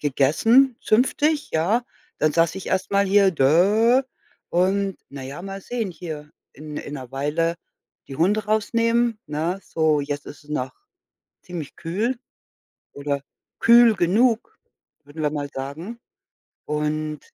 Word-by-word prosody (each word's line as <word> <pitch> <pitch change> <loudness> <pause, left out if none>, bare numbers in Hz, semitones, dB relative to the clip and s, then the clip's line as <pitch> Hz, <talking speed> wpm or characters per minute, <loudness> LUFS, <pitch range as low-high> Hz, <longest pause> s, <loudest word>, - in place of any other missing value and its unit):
gegessen, 225 - +3
zünftig, 290 +6 +1
ja. 200 +10 +1 0.3
Dann 155 0 +2
saß 165 0 +2
ich 190 - -7
erst 190 +1 -1
mal 200 0 +3
hier, 195 -1 +4 1.2
und, 190 +2 +1
na 140 -1 -8
ja, 140 +6 -7
mal 195 0 -6
sehen 225 -2 -3
hier 155 -4 -8 0.2
in 150 +1 -9
in 145 - -6
'ner 130 -3 -8
Weile 155 +5 -1 0.5
die 135 - -7
Hunde 205 +7 +2
rausnehmen, 230 +1 +1
ne? 165 +6 -2
So, 155 -2 +1
jetzt 145 0 -4
ist 145 - -11
es 150 - -16
noch 130 -3 -2 0.7
ziemlich 170 -5 -7
kühl 215 +9 -2 0.7
oder 140 0 -3 0.4
kühl 235 -1 +7
genug, 225 - +1 0.5
würden 145 +2 -8
wir 150 - +1
mal 145 -1 -3
sagen. 155 - -6 0.7
Und 150 0 -2
170 Hz, 130 wpm, -23 LUFS, 150-215 Hz, 1.2 s, kühl